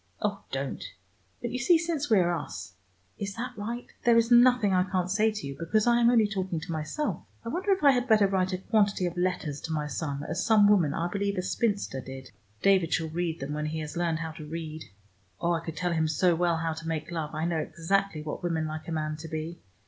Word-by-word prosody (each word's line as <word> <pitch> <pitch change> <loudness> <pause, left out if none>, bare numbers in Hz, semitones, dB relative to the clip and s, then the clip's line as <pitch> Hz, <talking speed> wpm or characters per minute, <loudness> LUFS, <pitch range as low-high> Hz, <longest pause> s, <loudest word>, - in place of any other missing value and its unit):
"Oh, - - -2
don't. - - -3 0.6
But 240 - -2
you 250 - -2
see 335 +8 +5
since 320 -4 -2
we 220 - +5
are 175 -1 +3
us 100 - -5 0.5
is 195 -1 -4
that 245 +2 -5
right? 230 +4 -4 0.2
there 235 -1 +5
is 230 +1 +3
nothing 240 -4 +6
I 180 - +4
can't 185 -1 0
say 215 +2 +3
to 210 -5 -6
you, 140 0 -5
because 165 +8 +1
I 240 0 +4
am 235 - +6
only 235 -3 +5
talking 190 -4 -2
to 160 - -7
myself. 160 - -2 0.2
I - - -3
wonder 365 - -2
if 385 -3 +1
I 280 - +8
had 250 -1 0
better 215 -3 +5
write 190 -1 +1
a 185 - -1
quantity 200 -1 +1
of 175 0 -3
letters 175 -5 -1
to 165 - -5
my 150 -1 -1
son, 145 0 -3
as 170 +4 -2
some 215 -2 +5
woman, 175 -8 +4
I 170 - 0
believe 200 +2 -2
a 180 - 0
spinster, 200 - -1
did. 130 0 -9 0.3
David 190 -4 +4
shall 160 -1 0
read 165 -1 -2
them 140 +2 -3
when 150 0 -2
he 160 +1 -3
has 150 -1 -6
learned 170 -2 0
how 160 0 -4
to 155 0 -9
read. 155 0 -6 0.5
Oh, 170 - +1
I 165 - +1
could 165 -1 -6
tell 180 -1 0
him 160 -1 +1
so 175 +3 +3
well 170 0 +1
how 165 0 -1
to 165 +1 -8
make 160 0 -3
love, 160 -2 -4
I 155 +1 -1
know 170 -2 0
exactly 165 +1 -1
what 150 - -5
women 165 -3 -1
like 155 0 -6
a - - -4
man 155 -1 -2
to 160 +1 -8
be. 160 +2 -5
175 Hz, 245 wpm, -28 LUFS, 160-210 Hz, 0.6 s, I